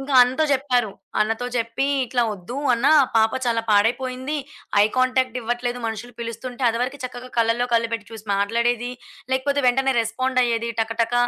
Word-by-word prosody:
ఇంకా 270 0 -3
అన్నతో 260 +5 +1
చెప్పారు. 250 -5 +1 0.3
అన్నతో 225 +3 0
చెప్పి, 230 +4 -1 0.2
ఇట్లా 245 0 +1
వద్దు 205 +6 -8 0.2
అన్న 235 +3 +1 0.3
పాప 220 0 +4 0.2
చాలా 230 -1 +2
పాడైపోయింది. 255 +7 +1 0.5
ఐ - - +6
కాంటాక్ట్ 255 -1 +2
ఇవ్వట్లేదు 240 +1 -2
మనుషులు 225 +2 -5
పిలుస్తుంటే, 240 +3 -6
అది 230 - -3
వరకు 270 +3 -3
చక్కగా 250 0 -7
కళ్ళలో 230 +2 +2
కళ్ళు 230 0 +2
పెట్టి 225 -2 -3
చూసి 220 -1 -10
మాట్లాడేది, 235 +4 0 0.4
లేకపోతే 280 +2 +1
వెంటనే 270 +2 +2
రెస్పాండయ్యేది 235 0 0
టక, 225 +1 -1
టక 230 +1 -2
245 Hz, 155 wpm, -22 LUFS, 230-255 Hz, 0.5 s, ఐ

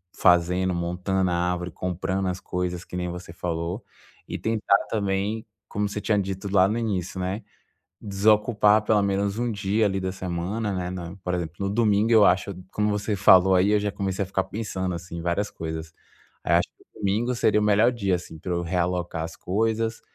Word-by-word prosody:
fazendo, 90 +1 +3
montando 90 +2 0
a - - +1
árvore, 90 0 -1
comprando 95 +2 -2
as 90 0 -2
coisas 90 -1 -3
que - - -9
nem 90 -1 -2
você 90 -1 -8
falou. 85 +4 -3 0.4
E - - -4
tentar 110 -3 +2
também, 100 +1 -1 0.2
como 105 0 -2
você 105 +1 -4
tinha 105 - +1
dito 95 0 -3
lá 95 -1 +5
no 110 +3 -1
início, 95 -5 -2
né, 95 +4 -3 0.6
desocupar 105 +1 +3
pelo 105 0 +2
menos 100 +1 0
um 120 0 0
dia 105 +1 +1
ali 95 -1 0
da 95 0 -2
semana, 95 +4 -3
né, 90 -1 -2
na 90 -1 -6
por 90 - -2
exemplo, 85 -1 -4
no 100 - -1
domingo, 105 +1 +2
eu 110 -3 +7
acho, 95 +2 +2 0.2
como 105 0 0
você 105 +1 -1
falou 95 -1 +6
aí, 95 +3 +4
eu 105 - +4
já 105 0 -1
comecei 100 -1 -2
a - - -5
ficar 95 0 -1
pensando 95 -4 -3
assim 85 0 -7
em 85 - -4
várias 90 +4 -1
coisas. 80 0 -6 0.5
Aí - - +1
acho - - +4
que - - -24 0.2
domingo 110 +5 0
seria 105 -2 +3
o - - +1
melhor 105 +3 +4
dia 100 -6 0
assim 85 -2 -8
para 90 - -5
eu 85 0 0
realocar 90 -1 -1
as 80 0 -6
coisas, 110 +3 -1
95 Hz, 195 wpm, -25 LUFS, 90-105 Hz, 0.6 s, eu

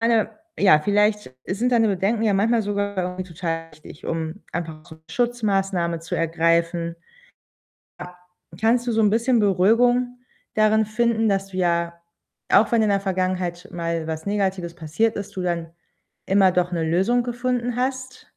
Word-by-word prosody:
meine, 230 -2 +2 0.3
ja, 185 -7 +6
vielleicht 205 -5 +1
sind 225 +7 -1
deine 225 -2 +4
Bedenken 200 +4 0
ja 215 -2 +2
manchmal 225 +3 +2
sogar 200 -1 -2
irgendwie 180 0 -2
total 165 -1 -4
wichtig, 155 +2 -13
um 165 +4 -4
einfach 160 -3 -5
auch - - -20
so - - -11
'ne 160 - -30
Schutzmaßnahme 195 -9 0
zu 165 - -5
ergreifen. 165 +1 0 1.0
A 180 0 -9 0.5
kannst 235 +2 +2
du 240 - 0
so 225 - +2
'n 210 -2 +4
bisschen 235 +1 +2
Beruhigung 240 +6 +3 0.4
darin 215 0 +3
finden, 225 0 +1
dass 195 0 0
du 185 - -9
ja, 170 -1 0 0.5
auch 215 - +5
wenn 230 -2 +4
in 215 - +2
der 200 - +2
Vergangenheit 185 -2 -2
mal 170 -1 -3
was 160 +2 -5
Negatives 190 -4 -1
passiert 175 +8 -1
ist, 205 0 -6
du 185 - -2
dann 170 -2 -2 0.6
immer 190 -1 +4
doch 180 0 0
'ne 165 -2 -1
Lösung 190 +10 +2
gefunden 245 0 -2
hast? 260 0 -3
195 Hz, 165 wpm, -23 LUFS, 170-225 Hz, 1.0 s, ja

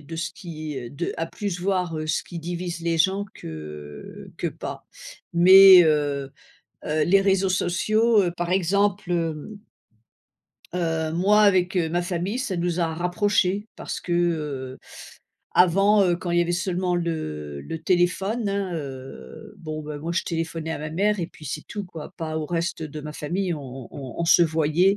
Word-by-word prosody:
de 160 +3 -8
ce 165 +2 -3
qui, 155 -5 -6
heu, 120 -2 -7
de 150 +7 -4
à 165 - -1
plus 185 0 -4
voir 180 -2 0
ce 155 - 0
qui 175 - -8
divise 175 +1 -4
les 165 0 0
gens 190 +5 +2
que 75 -2 -9
que - - -1
pas. - - -6 0.5
Mais, 185 +1 +9
heu, 145 -3 +1 0.5
heu, 155 0 +1
les 195 +5 +5
réseaux 195 -1 +2
sociaux, 215 +5 +2
par 175 0 -2
exemple, 195 +1 +1
hem 165 +4 -3 1.2
heu, 165 -2 -1
moi 205 +5 +4
avec, 185 -1 +2
heu, 170 -3 +2
ma 175 +2 +1
famille, 180 +5 -2
ça 200 -8 -2
nous 175 0 -1
a 170 - +2
rapprochés, 190 +3 +1
parce - - -5
que, 175 - -4
heu, 150 -7 -1 0.8
avant, 195 +4 +5
heu, 175 -2 +2
quand 175 0 -5
il 175 - +2
y - - +5
avait 175 0 -1
seulement 180 0 0
le 75 - -4
le 165 - -5
téléphone, 190 +5 +1
hein, 200 -2 -2
heu, 135 - -8
bon, 155 -1 -6
beh, 150 0 -6
moi, 165 +3 -4
je 170 - 0
téléphonais 165 -1 -3
à - - -4
ma 155 +1 -5
mère 200 +4 +1
et 165 - -2
puis 155 - -15
c'est 150 +2 -5
tout, 205 -1 -5
quoi. 165 -4 -9
Pas 160 -1 -3
au 155 - -3
reste 170 0 -2
de 150 0 -7
ma 150 0 -6
famille. 175 +5 -2
On 150 - -7 0.3
on 135 -4 -8
on 170 - 0
se 170 - +6
voyait 160 +4 +3
170 Hz, 180 wpm, -24 LUFS, 155-185 Hz, 1.2 s, Mais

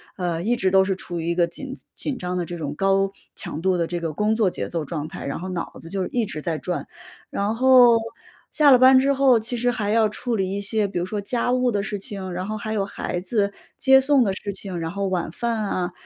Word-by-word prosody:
呃， 175 -3 -2
一 230 +7 +1
直 190 -5 +1
都 190 0 +5
是 190 0 0
处 175 -2 -6
于 165 - -4
一 170 - 0
个 175 -1 +3
紧 265 +10 -7 0.2
紧 280 -3 -3
张 180 -2 -3
的 175 - -1
这 175 +1 -6
种 150 -3 -4
高 195 +2 +2 0.2
强 155 - -4
度 185 0 +2
的 170 -1 0
这 175 0 -3
个 165 -2 -3
工 210 +7 +1
作 220 -4 +2
节 - - -5
奏 165 -3 -3
状 150 0 -4
态， 185 - -8
然 140 - -3
后 185 +2 -6
脑 180 -2 -4
子 165 - -10
就 190 0 -2
一 240 -2 -1
直 155 -7 -6
在 160 0 -2
转。 180 +3 -4 0.4
然 205 +2 -1
后， 250 -1 +7 0.5
下 300 -2 +5
了 255 - +8
班 260 +1 +7
之 275 +2 +2
后， 265 -3 +5
其 230 +3 -2
实 245 +1 +1
还 215 -4 -2
要 220 0 +4
处 230 +3 -3
理 190 -1 0
一 200 - -2
些， 210 +1 +1
比 195 - -5
如 175 - -1
说 205 +3 -3
家 235 +4 -1
务 250 0 +2
的 205 -2 0
事 210 -1 -3
情， 195 -1 -6
然 180 +2 -4
后 215 - -3
还 215 0 -5
有 200 -2 0
孩 180 -2 -4
子 200 +2 0 0.3
接 265 -1 +6
送 270 -1 +4
的 200 - +1
事 200 +1 -5
情， 190 -3 -5
然 165 0 -3
后 200 +1 -2
晚 180 -4 -1
饭 235 +7 -2
啊 185 -3 -2
195 Hz, 280 characters per minute, -23 LUFS, 180-230 Hz, 0.5 s, 了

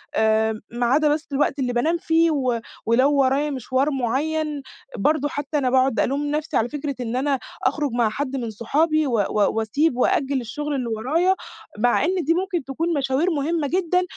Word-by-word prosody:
آآ، 220 0 +2
ما 240 0 -1
عدا 295 +5 +3
بس 310 +1 -4
الوقت 280 +1 0
اللي 250 -2 -1
بانام 315 +8 +1
فيه 330 0 +2
و 255 -5 0 0.2
ولو 255 +6 +3
ورايا 275 +2 +2
مشوار 265 +2 0
معيّن، 290 +4 -1 0.4
برضه 290 +6 +1
حتّى 290 +1 -3
أنا 260 -3 +1
باقعد 260 -1 +2
ألوم 280 +3 0
نفسي 305 +1 -1
على 230 +2 +1
فكرة 290 -2 -4
إن 240 0 -3
أنا 270 0 0 0.2
أخرج 285 +1 0
مع 235 -2 +1
حد 275 +3 -3
من 235 -4 -3
صحابي 305 +7 +1
و - - -2
و 205 +1 +1
وأسيب 250 +5 +1
وأأجّل 265 +1 +1
الشغل 295 +5 -4
اللي 250 -3 -2
ورايا، 310 +13 +1 0.4
مع 245 +5 +3
إن 370 +2 0
دي 330 +4 +2
ممكن 360 -3 -1
تكون 330 +5 -2
مشاوير 280 +5 +1
مهمّة 305 0 -1
جدًا، 360 +2 +1
275 Hz, 180 wpm, -22 LUFS, 245-310 Hz, 0.4 s, عدا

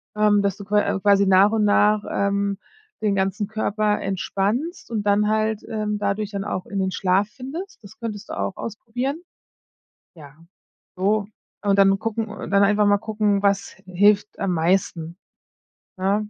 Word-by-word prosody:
Ähm, 210 -1 +3
dass 200 -1 -1
du 200 - -9
qua 210 +1 +2
äh, 195 - -1
quasi 200 0 +4
nach 190 +2 +5
und 220 -1 +2
nach, 210 +1 +3
ähm, 200 0 0 0.4
den 210 -2 +1
ganzen 195 +2 0
Körper 215 0 0
entspannst 200 - -2
und 215 -2 -1
dann 210 +1 +3
halt, 215 0 0
ähm, 210 -1 -2
dadurch 205 +1 -2
dann 200 -1 -3
auch 185 -3 -3
in 200 -2 -3
den 190 - 0
Schlaf 190 +2 +1
findest. 275 - -8
Das 215 +2 -14
könntest 220 -3 -6
du - - -5
auch - - -3
ausprobieren. 245 - -4 0.9
Ja, 150 -3 -14 0.6
so. 205 +3 +1 0.4
Und 200 -1 +2
dann 195 0 +5
gucken 225 0 -2
und 210 -1 -8
dann 200 0 +4
einfach 210 +1 +3
mal 205 - +4
gucken, 210 -2 0
was 200 0 +1 0.2
hilft 205 +3 +2
am 195 -2 0
meisten, 170 0 0 0.8
ne? 205 +3 0
205 Hz, 165 wpm, -22 LUFS, 195-215 Hz, 0.9 s, nach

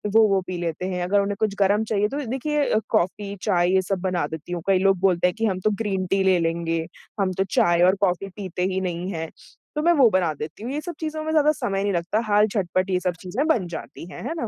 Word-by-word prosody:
वो 225 -1 +7
वो 195 -2 +2
पी 180 -1 -4
लेते 170 +1 -3
हैं। 180 -1 -2
अगर 200 +3 +2
उन्हें 200 0 -2
कुछ 215 -2 0
गरम 200 +2 +3
चाहिए 210 -1 +1
तो 285 0 -4
देखिए 285 +5 -1 0.2
कॉफ़ी, 200 0 0
चाय 175 -4 +2
ये 190 - +4
सब 190 0 -2
बना 180 -4 0
देती 160 +2 -8
हूँ। 175 - -3
कई 190 -1 +4
लोग 195 0 +3
बोलते 180 -2 +3
हैं 180 - -1
कि 225 - 0
हम 190 -3 0
तो - - +5
ग्रीन 195 -3 -1
टी 195 +1 +1
ले 190 -1 +4
लेंगे, 165 0 -1 0.3
हम 190 -2 +1
तो 190 - +3
चाय 175 0 +3
और 185 +2 +5
कॉफ़ी 195 0 0
पीते 185 -3 -4
ही 190 - -1
नहीं 180 +1 -3
है, 160 -1 -4 0.5
तो 300 - 0
मैं 345 - +4
वो 265 -7 +6
बना 185 -5 +1
देती 155 +8 -8
हूँ। 250 - -4
ये 295 - -2
सब 350 +1 -6
चीज़ों 310 -1 -3
में 315 - -2
ज़्यादा 305 -1 +4
समय 235 -10 -2
नहीं 200 -1 0
लगता, 175 +5 0
हाल 210 0 +4
झटपट 185 -2 -1
ये 185 -1 +1
सब 180 -1 -1
चीज़ें 210 +11 -2
बन 225 - +2
जाती 165 0 -8
हैं, - - -8
हैं - - -2
ना? 235 - -2
195 Hz, 260 wpm, -23 LUFS, 180-215 Hz, 0.5 s, वो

